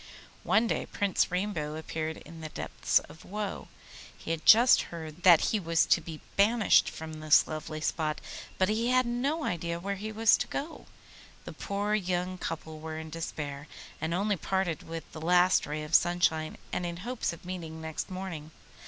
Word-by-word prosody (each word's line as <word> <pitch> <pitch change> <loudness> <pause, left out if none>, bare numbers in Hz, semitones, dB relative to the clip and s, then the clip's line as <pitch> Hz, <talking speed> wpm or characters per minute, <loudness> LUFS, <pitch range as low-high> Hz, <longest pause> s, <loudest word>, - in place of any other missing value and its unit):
One 220 +2 +3
day - - -1
Prince 200 -2 +1
Rainbow 180 -5 -2
appeared 160 0 -4
in 165 -1 -12
the 155 - -6
depths - - 0
of 160 +2 -4
woe. 205 +1 -5 0.5
He - - -5
had 165 -1 -3
just 235 +3 +8
heard 160 -1 -8
that 175 -3 +7
he 215 - +1
was 165 -3 +2
to - - +3
be 160 -2 -8 0.2
banished 215 +2 +4
from 160 -1 -8
this 155 -1 +5
lovely 155 0 -5
spot, 155 -1 -1 0.4
but 185 - +3
he 220 +3 0
had 255 0 +3
no 270 +7 -1
idea 170 - -2
where 200 +2 -3
he 215 +3 -5
was 220 0 +4
to - - -3
go. 300 +4 -5 0.6
The - - -7
poor 205 +1 -2
young 185 -2 -1
couple 160 -1 -5
were 160 0 -6
in 160 0 -7
despair, 150 -3 -5 0.3
and 160 - -1
only 200 +3 +1
parted 190 -3 -1
with 165 0 -6
the 160 - -9
last 180 +1 +4
ray 150 +1 -3
of 150 +2 -9
sunshine, 170 -3 +2 0.2
and - - -1
in 170 -1 -4
hopes 250 -1 -2
of 170 - -11
meeting 165 -3 -6
next 160 -1 -5
morning. 185 -5 -6
170 Hz, 180 wpm, -29 LUFS, 160-200 Hz, 0.6 s, just